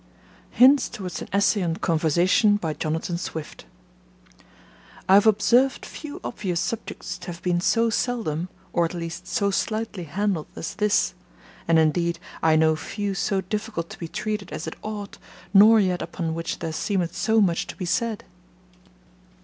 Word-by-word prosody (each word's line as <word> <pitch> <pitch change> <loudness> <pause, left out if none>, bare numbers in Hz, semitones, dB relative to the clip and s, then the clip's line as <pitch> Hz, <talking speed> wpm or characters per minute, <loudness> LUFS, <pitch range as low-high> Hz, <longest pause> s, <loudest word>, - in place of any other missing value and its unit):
1909–14. - - -19
Hints 270 +3 +6
Towards 180 -5 -6
an - - -7
Essay 200 +1 +2
on 165 -2 0
Conversation 175 +7 +2 0.2
Jonathan 165 +2 -2
Swift 160 -3 -7 1.4
I 190 - +5
HAVE 205 +3 +7
observed 245 +6 +3
few 305 +3 -8
obvious 185 -7 -3
subjects 225 +4 -4
to 175 - -11
have 175 -1 -7
been 175 -1 +1
so 230 +4 +2
seldom, 185 -9 -1 0.2
or, 170 - +3
at 165 - -4
least, 170 -1 -6
so 200 -1 0
slightly 215 -2 -2
handled 185 0 -1
as - - -5
this; 210 +1 +1 0.5
and, 165 0 +4
indeed, 170 +2 +2 0.2
I 160 -1 +4
know 160 0 +4
few 205 +5 -4
so 190 +1 0
difficult 190 -3 -4
to - - -10
be 170 - -5
treated 210 +2 -4
as - - -5
it - - -6
ought, 210 -2 -6 0.3
nor 215 +3 +8
yet 185 -3 +1
upon 165 -1 -3
which 165 0 -3
there 160 -1 -4
seemeth 180 0 -1
so 220 +3 +2
much 180 -5 +2
to - - -7
be 185 - -5
said. 225 +4 -1
190 Hz, 160 wpm, -24 LUFS, 170-215 Hz, 1.4 s, nor